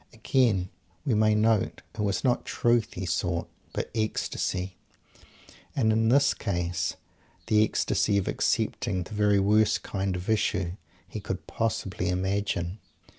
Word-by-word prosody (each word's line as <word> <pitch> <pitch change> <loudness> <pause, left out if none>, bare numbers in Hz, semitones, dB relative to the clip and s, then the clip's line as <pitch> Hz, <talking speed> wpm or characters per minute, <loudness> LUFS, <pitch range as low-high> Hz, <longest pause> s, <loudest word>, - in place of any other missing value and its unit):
Again, 110 -5 +2 0.4
we 130 - +2
may 110 0 +4
note, 110 -1 +1
it - - -14
was 100 -2 0
not 125 -3 +2
"Truth" 120 -2 +1
he 95 - -3
sought, 85 -1 -1 0.2
but - - -4
ecstasy, 95 -4 -2 1.0
and, 110 -5 +3
in 110 0 +3
this 140 +3 +5
case, 85 -4 -2 0.5
the 105 0 +4
ecstasy 105 -1 +1
of 100 - 0
"accepting" 90 -1 0
the 105 - -10
very 105 -1 +3
worst 105 +1 +3
kind 95 -1 -2
of 90 +2 -5
issue 100 -5 +1 0.4
he - - -6
could - - -5
possibly 105 -5 -2
imagine. 95 0 -1
100 Hz, 135 wpm, -27 LUFS, 90-110 Hz, 1.0 s, this